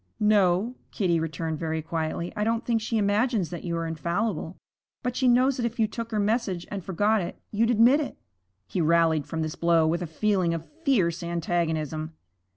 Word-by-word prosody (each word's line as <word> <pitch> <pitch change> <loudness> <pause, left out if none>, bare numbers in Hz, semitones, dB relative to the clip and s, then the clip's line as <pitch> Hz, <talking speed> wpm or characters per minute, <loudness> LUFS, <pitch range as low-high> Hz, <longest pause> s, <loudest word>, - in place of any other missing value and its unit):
'No,' 210 +1 +3 0.2
Kitty 175 -6 +1
returned 160 0 -3
very 160 -1 -2
quietly. 165 +1 -3
'I 210 - -1
don't 225 +1 0
think 230 -2 +1
she 225 +1 -1
imagines 205 -2 +1
that 175 - -6
you 170 -1 -2
are 165 - -2
infallible. 170 +3 -2 0.5
But 250 -1 -2
she 260 - +2
knows 255 +2 +4
that 240 - -1
if 235 +1 -9
you 220 - +5
took 230 +1 -5
her 215 -2 -1
message 205 -4 0
and 200 -3 -4
forgot 205 +4 +1
it, 175 - -6
you'd 225 +2 +2
admit 240 +5 +5
it.' 300 - -4 0.5
He 175 - -2
rallied 160 -2 +3
from 160 -1 -2
this 155 0 -3
blow 170 -1 +3
with 170 +2 0
a 175 - -3
feeling 180 0 +1
of 165 -1 -6 0.2
fierce 185 - +2
antagonism. 160 -2 -2
180 Hz, 190 wpm, -26 LUFS, 165-220 Hz, 0.5 s, you